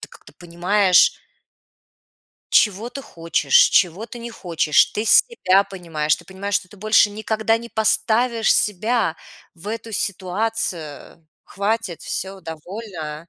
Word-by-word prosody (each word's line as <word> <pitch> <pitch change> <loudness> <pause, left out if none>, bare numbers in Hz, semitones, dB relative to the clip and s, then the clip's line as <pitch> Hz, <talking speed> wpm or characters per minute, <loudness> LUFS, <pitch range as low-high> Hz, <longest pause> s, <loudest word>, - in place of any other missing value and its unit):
ты - - -10
как-то - - -17
понимаешь 180 +2 +2 1.3
Чего 210 +2 +3
ты 275 +3 -8
хочешь, 165 - -3
чего 185 +4 +1
ты 240 - -10
не 235 0 -7
хочешь. 170 -8 +2
Ты 210 - -2
себя 200 - +4
понимаешь, 165 -6 -2
ты 175 - -16
понимаешь, 195 +3 -5
что 200 -2 -1
ты 205 - -16
больше 215 +1 +3
никогда 220 +1 -1
не 235 +1 -10
поставишь 225 +1 +1
себя 210 -2 0 0.4
в 175 +4 -10
эту 225 +1 -6
ситуацию. 185 -6 -3 0.2
Хватит, 205 -3 -3
всё, 190 +1 -5
довольно. 165 -2 -8
200 Hz, 125 wpm, -21 LUFS, 175-225 Hz, 1.3 s, себя